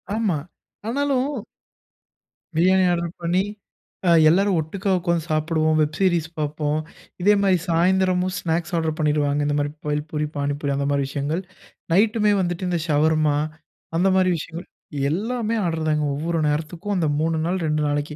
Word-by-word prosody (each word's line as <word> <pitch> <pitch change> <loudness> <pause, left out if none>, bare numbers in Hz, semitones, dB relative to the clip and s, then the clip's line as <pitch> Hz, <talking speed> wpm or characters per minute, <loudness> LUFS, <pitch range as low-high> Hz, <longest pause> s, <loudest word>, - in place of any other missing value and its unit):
ஆமா, 215 -7 +1 0.5
ஆனாலும் 275 +1 0 1.3
பிரியாணி 185 +3 +4
ஆர்டர் 170 -1 -1
பண்ணி 175 +3 +1 0.6
அ - - +5 0.2
எல்லாரும் 195 +2 +3
ஒட்டுக்கா 185 +6 -3
உக்கோந்து 170 -2 0
சாப்பிடுவோம், 155 0 +1
வெப் 155 0 0
சீரிஸ் 175 -4 +2
பார்ப்போம். 150 0 -1 0.4
இதே 205 +3 +5
மாரி 190 -2 +4
சாயந்திரமும் 185 +2 +2
ஸ்நாக்ஸ் 170 +1 -2
ஆர்டர் 160 -1 -1
பண்ணிடுவாங்க. 150 -2 +1
இந்த 145 0 0
மாதிரி 145 0 -1
பெல் 150 0 -1
பூரி, 150 -1 -1
பானி 145 0 -1
பூரி 145 -1 -1
அந்த 140 0 -1
மாரி 140 0 +1
விஷயங்கள் 145 +5 -2 0.5
நைட்டுமே 210 +2 +3
வந்துட்டு 175 0 -2
இந்த 175 - 0
ஷவர்மா 155 -1 +2 0.6
அந்த 180 +3 +3
மாதிரி 185 -1 +3
விஷயங்கள். 170 +3 -7 0.4
எல்லாமே 225 +6 -1
ஆர்டர் 160 -2 -1
தாங்க. 150 0 +1
ஒவ்வொரு 165 +3 -1
நேரத்துக்கும் 165 +7 -2
அந்த 165 -3 +1
3 160 +1 +1
நாள், 180 +3 0
2 155 0 0
நாளைக்கு. 145 +1 -2
165 Hz, 150 wpm, -23 LUFS, 150-185 Hz, 1.3 s, அ